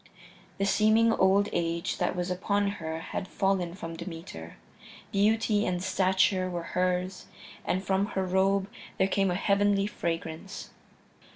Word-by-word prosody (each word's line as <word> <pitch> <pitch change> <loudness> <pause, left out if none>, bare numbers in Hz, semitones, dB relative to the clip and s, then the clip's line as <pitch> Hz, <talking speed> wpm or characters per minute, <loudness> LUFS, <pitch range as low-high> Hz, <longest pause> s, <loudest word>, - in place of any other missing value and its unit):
The 195 - 0
seeming 220 +3 +4
old 195 +1 +4
age 170 0 -1
that - - 0
was 180 0 -2
upon 200 +2 0
her 160 0 -3
had 190 - -5
fallen 190 -4 0
from 165 -4 -6
Demeter; 165 - -8 0.5
beauty 215 +1 +2
and 180 0 -1
stature 190 0 +2
were 175 -1 -4
hers, 180 0 -1 0.4
and 185 +2 0
from 195 +1 +1
her 190 - +1
robe 190 +1 +2 0.3
there 190 - +3
came 195 0 +1
a 180 - 0
heavenly 200 +1 +2
fragrance. 165 -1 -4
190 Hz, 135 wpm, -28 LUFS, 175-200 Hz, 0.5 s, seeming